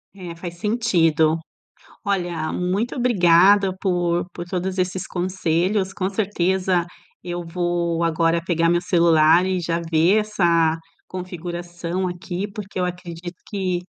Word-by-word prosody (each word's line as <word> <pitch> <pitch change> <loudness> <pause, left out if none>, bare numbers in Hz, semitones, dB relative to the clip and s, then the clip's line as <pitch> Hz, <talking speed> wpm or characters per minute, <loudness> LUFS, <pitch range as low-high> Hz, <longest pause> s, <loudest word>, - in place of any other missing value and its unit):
É, 175 -3 -8
faz 175 0 -8
sentido. 165 -8 +2 0.7
Olha, 175 -5 -1
muito 195 +9 -1
obrigada 195 -4 +5
por 175 -2 0
por 175 - -5
todos 185 +1 -3
esses 185 +1 -1
conselhos, 185 +2 0
com 190 +1 -2
certeza 190 -3 0 0.4
eu 175 0 -5
vou 170 -1 -1
agora 165 0 +1
pegar 165 -2 +1
meu 175 0 +3
celular 170 -1 +4
e 185 -1 0
já 170 0 -1
ver 170 +6 +4
essa 170 -6 +2 0.3
configuração 175 0 -4
aqui 180 +3 -5
porque 200 -3 -6
eu - - +1
acredito 175 0 -6
que 185 -4 -2
175 Hz, 125 wpm, -22 LUFS, 170-190 Hz, 0.7 s, obrigada